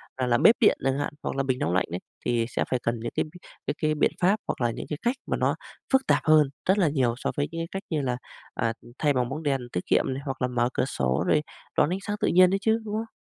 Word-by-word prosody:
ờ, 130 - -1
làm 120 -1 +2
bếp 230 - +8
điện 225 - +5
chẳng 135 +1 +1
hạn 145 - -2
hoặc - - -3
là 135 - 0
bình 130 -1 -1
nóng 85 - 0
lạnh 95 - +2
ấy, 90 - -2 0.3
thì 120 -1 +1
sẽ - - 0
phải 125 - +1
cần 115 0 -1
những 115 +1 -4
cái - - +1 0.4
cái - - +1
cái 155 0 +2
biện - - +2
pháp 190 +4 +5
hoặc - - -3
là 120 -1 +2
những - - -6
cái 150 - -3
cách 240 +2 +1
mà - - 0
nó - - +1 0.4
phức 265 0 +4
tạp - - +4
hơn 155 -3 +5 0.2
rất 190 +2 +4
là 180 - +4
nhiều 130 -5 +1
so - - -2
với 145 0 +1
những 165 - -5
cái 165 - -3
cách 195 +1 -4
như 155 -3 0
là, 125 -2 -1 0.4
à, 115 0 0 0.3
thay 145 -2 +3
bằng 125 -2 0
bóng 155 +4 -5
đèn 140 -3 +1
tiết 90 - -3
kiệm - - +3
này 135 - -5
hoặc 135 -1 -4
là 125 - +2
mở 120 -1 +1
cửa - - +1
sổ 65 - 0
rồi 150 - +4 0.4
đón 150 - +4
ánh 185 +2 -1
sáng 205 +1 -3
tự - - +1
nhiên 185 +1 +6
đấy 195 - +1
chứ, 220 +1 +2
đúng 210 0 -3
không? 225 0 -4
140 Hz, 295 wpm, -26 LUFS, 125-180 Hz, 0.4 s, bếp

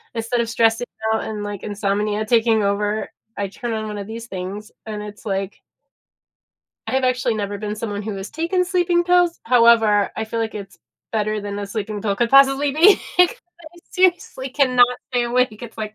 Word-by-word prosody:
Instead 230 +2 -1
of 230 - -3
stressing 225 +1 +2 0.3
out 220 - -1
and, 215 -1 -5
like, 205 -2 -6
insomnia 210 +1 -1
taking 225 -1 +3
over, 205 +1 -1 0.3
I 200 - -1
turn 235 +4 -5
on 215 -1 -3
one 210 -1 -5
of 200 -1 -6
these 230 +1 -7
things, 195 +2 -6
and 210 -1 -5
it's 210 +1 -11
like 195 -1 -3 1.3
I’ve 265 0 0
actually 250 -2 +1
never 205 -1 -3
been 210 0 -4
someone 210 -2 -4
who 210 0 -4
has 195 +1 -7
taken 340 +3 0
sleeping 350 -1 +1
pills. 355 -1 +2
However, 230 -4 +4
I 220 - -2
feel 230 +1 -4
like 225 -1 -3
it's 200 -2 -9 0.3
better 215 -1 -1
than 205 0 -5
a 205 - -4
sleeping 210 0 -4
pill 200 -1 -1
could 235 +1 0
possibly 275 +1 +5
be, 345 +8 +6 0.2
‘cause 360 +6 +5
I 345 -2 -17
seriously 350 -7 0
cannot 255 -3 +4 0.2
stay 245 -1 0
awake. 240 -2 0
It's 230 -2 -9
like, 215 -1 -5
220 Hz, 190 wpm, -21 LUFS, 210-255 Hz, 1.3 s, be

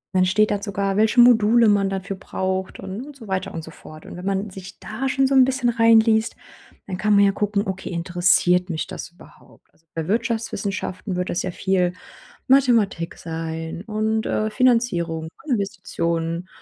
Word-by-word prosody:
Dann 185 0 +4
steht 210 +3 +2
da 205 -1 -1
sogar, 200 -1 -2
welche 220 +4 +3
Module 235 -1 +5
man 200 -2 +3
dafür 195 0 -4
braucht 190 0 -4
und 195 +4 -6
und 290 +1 -11
so 235 -5 -13
weiter 190 -1 -2
und 165 - -6
so - - -10
fort. 155 0 -13
Und - - -9
wenn 180 +1 -8
man 195 +1 -2
sich 190 0 -11
da 260 +5 -4
schon 270 0 +2
so 270 - +1
'n 265 -1 +7
bisschen 260 -1 +1
reinliest, 225 -1 +4 0.5
dann 185 -2 -5
kann 210 -1 +3
man 200 - +6
ja 200 - +4
gucken: 205 0 -1
„Okay, 190 0 -5
interessiert 180 +1 +2
mich 160 -3 -2
das - - -8
überhaupt?“ 175 - -20
Also 165 - -34
bei 160 -1 -3
Wirtschaftswissenschaften 210 -3 -2
wird 180 0 -2
das 175 - -1
ja 185 - -3
viel 180 0 0 0.5
Mathematik 235 -10 +2
sein 165 0 -5
und, 220 0 -1
äh, 215 0 -1
Finanzierung 210 -10 +1 0.2
und 300 - -4
Investitionen 170 -4 -2
195 Hz, 180 wpm, -22 LUFS, 180-220 Hz, 0.5 s, n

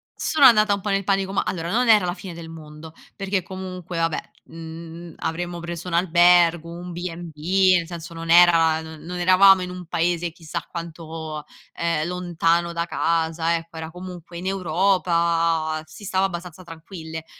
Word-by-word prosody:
sono 305 -3 +3
andata 215 -4 +6
un 200 - -2
po' 210 - -3
nel 195 0 +1
panico. 195 0 0
Ma - - +2
allora 170 -1 -3
non 245 +2 +2
era 210 -4 +6
la 175 - -1
fine 185 -2 -9
del 165 -1 -9
mondo, 155 0 -11 0.2
perché 195 -2 -2
comunque, 185 -1 -7
vabbè, 165 -1 0 0.3
mhmm, 165 0 -10
avremmo 175 +1 -4
preso 170 +1 -6
un 175 - -5
albergo, 175 -1 +4
un 175 +1 -8
B&B 175 +2 +1
nel 165 -1 -3
senso 170 -1 -8
non 165 0 -7
era 165 -2 +6
non 160 +3 -8
eravamo 185 +2 +6
in 180 - -5
un 180 0 -8
paese 170 0 0
chissà 165 0 -6
quanto, 160 -2 -7 0.3
ehm, 165 -2 -1
lontano 170 -1 0
da 170 0 -1
casa, 165 0 0
ecco, 165 0 -7
era 160 0 -6
comunque 180 -1 -9
in 180 - -7
Europa, 170 -3 +1
si 180 +8 -14
stava 190 0 +1
abbastanza 180 -1 -6
tranquille; 160 -1 -9
170 Hz, 165 wpm, -23 LUFS, 165-180 Hz, 0.3 s, andata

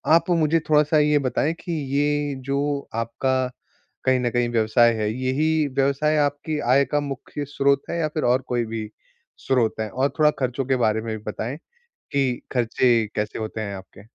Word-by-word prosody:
आप 170 - +2
मुझे 165 -1 +3
थोड़ा-सा 150 +1 +4
ये 150 0 +3
बताएँ 140 +4 0
कि 175 - -6 0.2
ये 145 -1 +1
जो 140 +1 -1
आपका 130 +3 0 0.6
कहीं 130 -1 +3
न 120 -1 0
कहीं 120 -1 +1
व्यवसाय 115 +1 +3
है 105 0 0
यही 145 +5 +1
व्यवसाय 140 +3 +2
आपकी 145 +1 0
आय 140 +1 +5
का 145 - +2
मुख्य 145 +1 -5
स्रोत 140 0 +1
है 170 - -2
या 155 - +1
फिर 155 - -1
और 125 +2 +3
कोई 120 -1 0
भी 110 -1 -5 0.5
स्रोत 125 -4 +1
है? 110 -1 -2
और 130 +6 0
थोड़ा 150 0 +5
खर्चों 130 0 -1
के 130 0 +1
बारे 110 -2 +1
में 110 -1 -4
भी 105 - -14
बताएँ 125 +8 -4 0.6
कि 135 -3 0
खर्चे 120 -1 +2
कैसे 105 0 -3
होते 110 0 -4
हैं 100 -2 -4
आपके? 95 +1 -13
130 Hz, 180 wpm, -23 LUFS, 115-145 Hz, 0.6 s, आय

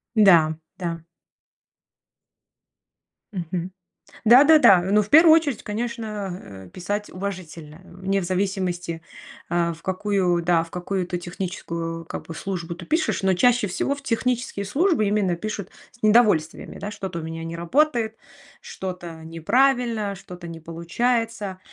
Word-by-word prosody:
Н-да, 170 -7 +6 0.2
да. 170 -3 -4 2.3
Мгм. 175 0 -4 0.5
Да-да-да, 260 - +7
но 200 +3 +3
в 210 - -6
первую 320 +1 +8
очередь, 290 -8 0
конечно, 210 - -5
э, - - -15
писать 205 +4 -3
уважительно, 175 -4 -7
э, - - -19 0.2
не 195 0 +2
в - - -3
зависимости, 180 -3 -2 0.5
а, 170 -1 +1
в 165 - -15
какую, 185 -2 0
да, 165 -1 +3
в 165 - -14
какую-то 180 0 -3
техническую, 170 -2 -5
как - - -6
бы, 165 - -7
службу 170 -3 -4
ты 175 - -10
пишешь, 320 - 0
но 190 -1 +3
чаще 235 +3 +3
всего 275 +9 -1
в 285 - -11
технические 240 -4 -1
службы 290 - +2
именно 200 -4 +1
пишут 205 -1 -5 0.2
с 235 - -25
недовольствами, 210 -8 +3
да? 205 - -5
Что-то 190 -4 -5
у - - -7
меня 165 0 -6
не 165 0 -5
работает, 225 - +1 0.4
что-то 175 -4 -7
неправильно, 220 - +1
что-то 180 -2 -10
не 165 0 -8
получается. 200 +5 -2
190 Hz, 135 wpm, -23 LUFS, 170-220 Hz, 2.3 s, первую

